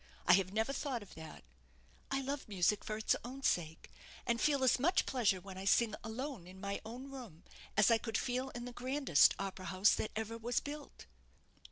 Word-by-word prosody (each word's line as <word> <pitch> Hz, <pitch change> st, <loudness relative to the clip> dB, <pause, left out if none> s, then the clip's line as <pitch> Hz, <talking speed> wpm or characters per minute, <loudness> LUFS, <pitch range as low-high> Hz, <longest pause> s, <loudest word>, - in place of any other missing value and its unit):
I -, -, +7 dB
have 185 Hz, 0 st, +3 dB
never 220 Hz, +6 st, 0 dB
thought 265 Hz, -6 st, -3 dB
of 200 Hz, -, -15 dB
that 160 Hz, -1 st, -10 dB, 0.7 s
I 275 Hz, 0 st, 0 dB
love 275 Hz, +1 st, -4 dB
music 200 Hz, +1 st, +2 dB
for 215 Hz, -, -3 dB
its 220 Hz, -, +2 dB
own 265 Hz, +3 st, -8 dB
sake, 160 Hz, -7 st, -1 dB, 0.3 s
and 235 Hz, -1 st, +1 dB
feel 285 Hz, -3 st, +3 dB
as 260 Hz, -, +4 dB
much 350 Hz, +8 st, +3 dB
pleasure 220 Hz, -7 st, +2 dB
when 190 Hz, 0 st, -9 dB
I 190 Hz, -, -6 dB
sing 215 Hz, +2 st, +4 dB
alone 225 Hz, -, -5 dB
in 185 Hz, +1 st, -12 dB
my 200 Hz, +1 st, -3 dB
own 250 Hz, +5 st, -8 dB
room, 230 Hz, -, -10 dB, 0.3 s
as 215 Hz, +2 st, +6 dB
I 230 Hz, -, +5 dB
could 225 Hz, -1 st, -2 dB
feel 255 Hz, +2 st, -1 dB
in 240 Hz, -1 st, -7 dB
the 245 Hz, -, -7 dB
grandest 255 Hz, -, +4 dB
opera 195 Hz, -1 st, -5 dB
house 190 Hz, +2 st, +4 dB
that 215 Hz, -, -1 dB
ever 220 Hz, +1 st, -3 dB
was 240 Hz, +2 st, 0 dB
built." 290 Hz, 0 st, -8 dB
225 Hz, 200 wpm, -35 LUFS, 195-260 Hz, 0.7 s, I